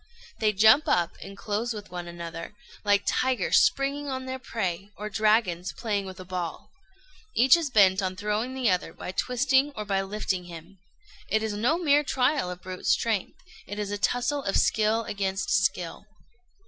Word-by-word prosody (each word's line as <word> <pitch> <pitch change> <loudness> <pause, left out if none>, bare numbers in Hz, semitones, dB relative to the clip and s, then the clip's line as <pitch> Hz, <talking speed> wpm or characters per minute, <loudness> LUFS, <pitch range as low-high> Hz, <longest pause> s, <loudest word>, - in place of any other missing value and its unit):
They 215 -1 +3
jump 220 +8 +5
up 170 -1 +1
and 195 0 -9
close 220 +4 -2
with 205 -3 -9
one 175 -1 -6
another, 170 +2 -7 0.3
like 205 -1 +3
tigers 255 -6 +2
springing 280 +1 +1
on 260 -1 -4
their 260 0 -5
prey, 195 -6 -3
or 210 +1 -5
dragons 210 -5 +1
playing 205 -4 -2
with 185 0 -9
a 185 - -8
ball. 180 -2 -5 0.6
Each 255 +4 +7
is 335 -4 -1
bent 200 -4 +5
on 185 -1 -2
throwing 210 +6 -2
the 260 -2 0
other 180 -3 0
by - - -7
twisting 265 +6 +2
or 210 - -5
by 195 -1 0
lifting 195 -2 -3
him. 175 +2 -11 0.5
It 220 0 +1
is 220 -1 -2
no 235 +10 +1
mere 295 -4 +3
trial 265 -5 +1
of 180 0 -8
brute 185 0 -6
strength; 220 -5 +1 0.3
it 205 - -6
is 205 -1 -3
a 205 - -2
tussle 245 +6 0
of 195 - 0
skill 220 +1 +2
against 195 -2 -2
skill. 185 -2 0
210 Hz, 175 wpm, -27 LUFS, 185-245 Hz, 0.6 s, Each